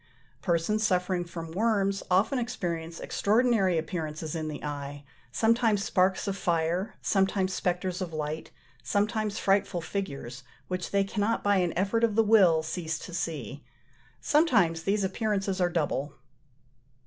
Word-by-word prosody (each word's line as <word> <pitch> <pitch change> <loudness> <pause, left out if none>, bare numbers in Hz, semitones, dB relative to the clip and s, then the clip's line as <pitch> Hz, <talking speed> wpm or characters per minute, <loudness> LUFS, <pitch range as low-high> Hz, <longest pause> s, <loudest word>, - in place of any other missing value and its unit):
Persons 175 +5 +1
suffering 180 -2 +1
from 165 -1 -7
worms 200 0 +1
often 200 +9 +3
experience 170 -8 -4
extraordinary 215 -4 +2
appearances 155 -1 -4
in 160 -2 -3
the 150 -2 -6
eye, 145 -1 -5 0.3
sometimes 225 - +2
sparks 190 -1 +1
of 195 - -1
fire, 175 +2 0
sometimes 195 -1 +1
spectres 180 +1 -1
of 180 -2 -3
light, 155 0 -4 0.3
sometimes 210 - 0
frightful 195 -2 +1
figures, 140 -8 -5 0.3
which 185 -1 -3
they 200 0 +2
cannot 205 +3 -1
by 205 -1 +3
an 180 -2 +1
effort 200 +5 +1
of 225 -3 +2
the 225 - +5
will 190 -7 +5
cease 160 0 -3
to 180 - -9
see: 145 - -4 0.6
sometimes 225 - +3
these 200 +3 0
appearances 195 -1 -1
are 175 - +3
double. 150 -4 -1
185 Hz, 135 wpm, -28 LUFS, 165-205 Hz, 0.6 s, the